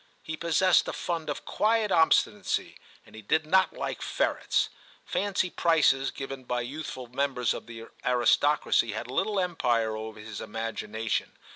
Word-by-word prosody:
He 160 - -4
possessed 170 +1 +3
a - - -3
fund 170 -3 -3
of - - -4
quiet 220 -1 +1
obstinacy, 160 -3 +2 0.3
and - - -19
he 110 - -10
did 155 +9 +1
not 190 +4 +3
like - - -4
ferrets; - - 0 0.4
fancy 195 -3 0
prices 150 -5 +3
given 135 -1 -7
by 125 0 -2
youthful 130 0 -6
members 125 -1 0
of - - -8
the 115 -1 -9 0.2
aristocracy 125 -1 +3
had 115 +3 -5
little 205 +8 0
empire 120 -11 +1
over 110 0 -7
his 105 -1 -7
imagina 115 0 -5
tion. - - -1
135 Hz, 150 wpm, -28 LUFS, 115-165 Hz, 0.4 s, possessed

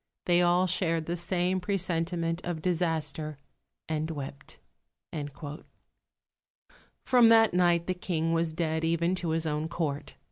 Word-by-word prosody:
They 175 0 +4
all 175 +1 +4
shared 165 -3 0
the 170 - -2
same 180 +1 0
presentiment 175 -3 -1
of 170 -3 -4
disaster, 160 -4 -1 0.5
and 155 0 -2
wept." 140 -3 -7 2.5
From 245 -3 +6
that 225 -2 +6
night 175 -1 +3
the 185 - 0
King 165 -2 -1
was 165 -1 +1
dead, 160 -1 -1
even 170 +2 +1
to 180 -2 -2
his 160 0 0
own 155 0 -1
Court. 155 -4 -3
170 Hz, 130 wpm, -29 LUFS, 160-180 Hz, 2.5 s, From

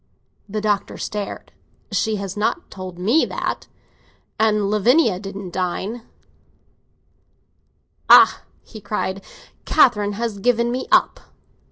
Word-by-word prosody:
The 215 +1 -3
Doctor 205 -1 -1
stared. 205 -1 -6 0.4
"She 220 -1 0
has 195 -2 -5
not 215 +11 -2
told 185 -2 -8
me 225 - +2
that—and 210 -2 -4
Lavinia 220 - +3
didn't 195 -2 -7
deign. 190 +6 -3 2.1
Ah!" - - +7 0.2
he 215 - -12
cried, 195 -1 -3 0.4
"Catherine 210 -8 +3
has 220 -1 -4
given 235 +1 +1
me 255 +1 -3
up. - - +3
210 Hz, 100 wpm, -21 LUFS, 195-230 Hz, 2.1 s, Ah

